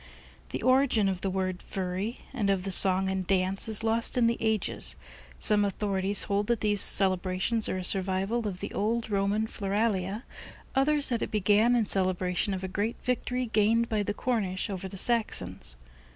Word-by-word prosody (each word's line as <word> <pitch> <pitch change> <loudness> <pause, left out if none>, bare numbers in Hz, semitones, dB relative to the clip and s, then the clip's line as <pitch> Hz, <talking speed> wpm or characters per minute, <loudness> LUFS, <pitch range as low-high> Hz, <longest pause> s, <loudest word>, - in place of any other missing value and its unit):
The - - -5
origin 255 -5 +3
of 185 -2 -2
the 195 - -1
word 185 -1 -3
"Furry," 190 +4 -4
and 215 -7 -1
of 195 -2 0
the 195 - -4
song 190 0 +4
and 190 -1 -3
dance, 190 +1 +1
is 220 0 +1
lost 225 +2 0
in 240 - +3
the 230 0 +2
ages. 220 -2 +1 0.4
Some 210 -2 +2
authorities 200 -1 0
hold 205 0 -1
that 235 -2 0
these 205 -2 +1
celebrations 190 +3 +4
are - - -2
a 185 - -4
survival 195 +5 -1
of 185 -2 -6
the 200 - -6
old 225 +2 -2
Roman 200 +2 0
Floralia, 205 0 -2 0.5
others 285 +1 +2
that 235 -3 -1
it - - -2
began 210 +3 +2
in 230 -3 +2
celebration 185 0 -1
of 185 - -7
a - - -2
great 205 +5 -2
victory 250 0 -2
gained 225 +1 +1
by 215 -2 0
the 205 0 -3
Cornish 205 -6 -2
over 190 0 -5
the 195 - -9
Saxons. 230 - +1
205 Hz, 180 wpm, -28 LUFS, 190-225 Hz, 0.5 s, song